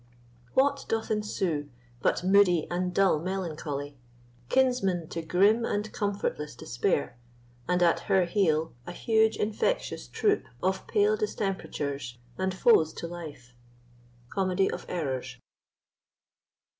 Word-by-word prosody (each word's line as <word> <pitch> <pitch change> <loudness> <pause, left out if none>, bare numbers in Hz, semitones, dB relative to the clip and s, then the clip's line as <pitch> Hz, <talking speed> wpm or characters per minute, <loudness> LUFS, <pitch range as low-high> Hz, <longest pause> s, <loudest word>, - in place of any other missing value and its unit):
What 275 +2 +3
doth 225 0 -1
ensue 185 -8 -1 0.3
But - - +1
moody 185 -3 +4
and 180 +1 -1
dull 190 -4 +3
melancholy, 150 -6 -4 0.5
Kinsman 235 -11 +2
to 165 - -4
grim 200 +8 +3
and 210 -1 -2
comfortless 200 - -2
despair, 120 0 -1 0.5
And 180 0 +2
at 170 - +4
her 190 -2 +4
heel, 165 -4 +1
a 175 - -5
huge 220 +2 +2
infectious 220 - -1
troop 415 -1 +1 0.2
Of - - 0
pale 425 0 +3
distemperatures, 145 - -3 0.2
and 190 0 -1
foes 185 -4 +4
to - - -6
life? 150 -8 -9 0.8
Comedy 190 +2 +1
of - - -6
Errors. 130 -7 -3
180 Hz, 115 wpm, -28 LUFS, 155-210 Hz, 0.8 s, moody